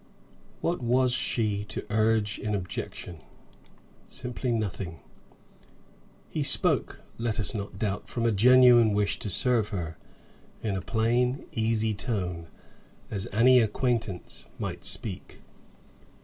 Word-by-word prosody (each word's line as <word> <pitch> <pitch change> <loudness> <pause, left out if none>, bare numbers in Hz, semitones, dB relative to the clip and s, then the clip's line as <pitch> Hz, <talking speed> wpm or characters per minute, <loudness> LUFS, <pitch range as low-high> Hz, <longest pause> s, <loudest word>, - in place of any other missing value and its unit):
What 170 -3 -1
was 125 +1 +2
she 105 -5 0
to - - -5
urge 110 -1 +1
in 105 -1 -2
objection? 90 -2 -6 0.9
Simply 125 0 -3
nothing. 100 -6 -3 1.3
He - - -3
spoke, - - +2 0.2
let 115 -2 -1
us 105 - +2
not 100 -3 -5
doubt, 105 -1 -3
from 120 -1 -2
a 115 - +3
genuine 120 0 +6
wish 100 -1 +1
to 105 - -3
serve 120 +1 +4
her, 85 -6 -5 0.7
in 105 -3 -1
a 95 - -2
plain, 120 +6 0
easy 110 -4 0
tone, 90 -7 -3 0.6
as 100 -3 -3
any 125 +4 +6
acquaintance 115 -3 -1
might - - -5
speak. - - -3
110 Hz, 120 wpm, -27 LUFS, 100-120 Hz, 1.3 s, genuine